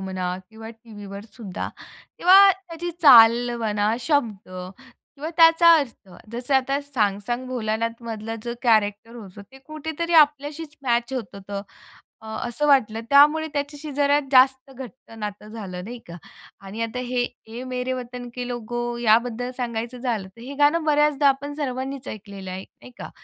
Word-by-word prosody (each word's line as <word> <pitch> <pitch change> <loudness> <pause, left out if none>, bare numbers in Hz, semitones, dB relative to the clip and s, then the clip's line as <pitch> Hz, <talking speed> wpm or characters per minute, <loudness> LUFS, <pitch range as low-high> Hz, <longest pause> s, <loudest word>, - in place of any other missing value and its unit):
म्हणा 185 -1 -3
किंवा 220 0 -10
टीव्हीवर 205 -3 -11
सुद्धा, 205 -7 -6 0.5
तेव्हा 390 +2 +8
त्याची 345 -2 -7
चाल 240 -2 +8
म्हणा, 210 -1 0
शब्द 235 - -1
किंवा 265 - -10
त्याचा 330 0 +7
अर्थ. 240 -8 -6 0.2
जसं 245 +3 -2
आता 270 +2 +1
"सांग-सांग 240 -2 -2
भोलानाथ" 230 -1 -2
मधला 225 0 -5
जो 235 0 -4
कॅरेक्टर 220 -1 +1
होता 200 -3 -11
ते 270 - -13
कुठेतरी 320 +2 -4
आपल्याशीच 295 +1 -9
मॅच 240 0 0
होत 225 -8 -5
होतं 200 0 -6 0.6
अ, - - -10 0.2
असं 295 +5 -1
वाटलं. 225 -6 +3
त्यामुळे 300 +3 +5
त्याच्याशी 290 +1 -4
जरा 285 +1 +3
जास्त 265 +1 +4
घट्ट 260 -2 -12
नातं 210 0 -6
झालं 190 -5 -7
नाही 240 +3 -8
का 170 0 -9 0.5
आणि 215 +4 -7
आता 230 +2 -4
हे, 250 -1 0 0.3
"ऐ - - -5
मेरे 250 +1 -2
वतन 245 -1 -6
के 250 -1 -4
लोगों", 240 0 -4
याबद्दल 235 +2 +2
सांगायचं 240 0 -4
झालं 225 -6 -3
तर 230 +5 -19
हे 275 +3 -8
गाणं 305 +3 +3
बऱ्याचदा 295 -1 +3
आपण 285 +2 -1
सर्वांनीच 270 -2 -4
ऐकलेलं 200 -3 -8
आहे, 185 +1 -6
नाही 250 - -17
का. - - -7
245 Hz, 150 wpm, -23 LUFS, 220-280 Hz, 0.6 s, तेव्हा